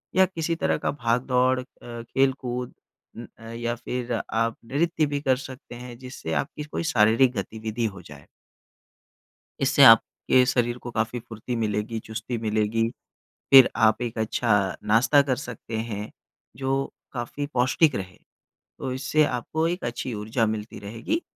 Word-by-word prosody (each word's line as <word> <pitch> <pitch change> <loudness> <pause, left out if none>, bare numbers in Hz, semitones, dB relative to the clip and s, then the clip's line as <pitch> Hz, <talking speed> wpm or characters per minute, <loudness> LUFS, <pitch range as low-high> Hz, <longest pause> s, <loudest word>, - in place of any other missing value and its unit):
या 190 0 +6
किसी 170 -2 -2
तरह - - 0
का - - +2
भाग-दौड़ 125 0 +1
अ, - - -5 0.2
खेल-कूद 125 +1 -2 0.4
उम, 120 - -7 0.3
या 120 0 -2
फिर 125 +1 -4
आप 115 0 -1
नृत्य 155 +5 +1
भी 145 -1 -2
कर 130 -3 +2
सकते 130 -2 -11
हैं 120 0 -9
जिससे 130 +1 -6
आपकी 150 0 -8
कोई 150 +3 -4
शारीरिक 115 +4 +5
गतिविधि 110 +1 -3
हो 90 - -10
जाए। 75 -4 -14 1.3
इससे - - +5
आपके 130 0 +6
शरीर 120 -1 +1
को 120 0 -8
काफ़ी 115 +2 -1
फ़ुर्ती 115 +2 -6
मिलेगी, 110 0 -1
चुस्ती 110 +2 -5
मिलेगी। 110 +1 0 0.6
फ़िर 135 -2 +10
आप 110 0 +3
एक 120 -2 -3
अच्छा 105 -2 +1
नाश्ता 120 +7 +5
कर 135 -2 0
सकते 120 -4 -6
हैं 105 0 -5 0.5
जो 135 +1 -1 0.2
काफ़ी 125 +3 -4
पौष्टिक 130 +4 +3
रहे। 95 -2 -6 0.6
तो 130 - -3
इससे 140 +4 +2
आपको 145 +5 -1
एक 175 +2 -3
अच्छी 120 +1 -3
ऊर्जा 110 +2 0
मिलती 110 0 -4
रहेगी 115 - -3
120 Hz, 145 wpm, -25 LUFS, 110-130 Hz, 1.3 s, फ़िर